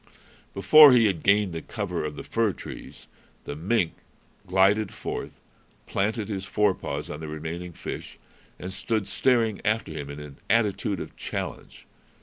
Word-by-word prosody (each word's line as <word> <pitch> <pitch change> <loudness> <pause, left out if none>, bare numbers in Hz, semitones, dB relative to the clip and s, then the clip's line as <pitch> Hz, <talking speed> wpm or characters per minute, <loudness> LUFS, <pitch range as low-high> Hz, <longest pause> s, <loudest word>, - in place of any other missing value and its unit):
Before 150 +9 +9
he 120 -2 +6
had 95 -7 +1
gained 100 -2 +3
the 80 - -4
cover - - -4
of 75 -1 -4
the - - -7
fir 115 -4 0
trees, - - -10 0.4
the 70 - -6
mink 90 +2 0 0.5
glided 95 +3 +3
forth, - - -6 0.5
planted 105 +2 -1
his 100 -3 -4
forepaws 100 0 -1
on 75 - -6
the 80 - -6
remaining 80 +3 -5
fish, - - -7 0.4
and 95 +1 -7
stood 110 +2 -1
staring 115 -5 +1
after 110 -4 0
him 75 -2 -6
in 70 +1 -7
an 75 -2 -10
attitude 105 -3 +1
of - - -8
challenge. - - -6
100 Hz, 150 wpm, -26 LUFS, 80-110 Hz, 0.5 s, Before